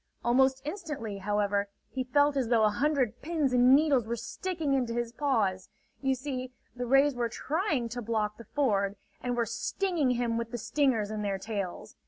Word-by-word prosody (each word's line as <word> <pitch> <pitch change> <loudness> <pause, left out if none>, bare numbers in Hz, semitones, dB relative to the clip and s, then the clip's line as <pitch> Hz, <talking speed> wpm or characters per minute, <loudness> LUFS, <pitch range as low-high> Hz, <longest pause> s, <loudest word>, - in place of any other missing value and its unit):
Almost 265 +2 +3
instantly, 295 - -5
however, 205 0 0 0.2
he 260 - -2
felt 285 +2 +3
as 265 -4 +1
though 230 -2 +3
a 210 - +4
hundred 275 0 0
pins 305 -4 0
and 250 +1 +7
needles 280 -6 +3
were 235 - -1
sticking 325 - -3
into 245 -4 0
his 240 -1 -1
paws. 220 -9 0 0.3
You 265 -1 +2
see, 255 -1 -5 0.2
the 245 0 -3
rays 275 +3 +5
were 240 -1 -1
trying 300 - -1
to 245 +1 -4
block 215 -2 -1
the 230 - -10
ford, 200 -7 +1 0.3
and 245 -1 -2
were 235 - +2
stinging 345 - -1
him 240 -2 0
with 230 -1 -4
the 240 - -4
stingers 230 -2 +1
in 215 -1 -3
their 200 -2 -1
tails. 200 -3 -5
245 Hz, 185 wpm, -29 LUFS, 220-280 Hz, 0.3 s, and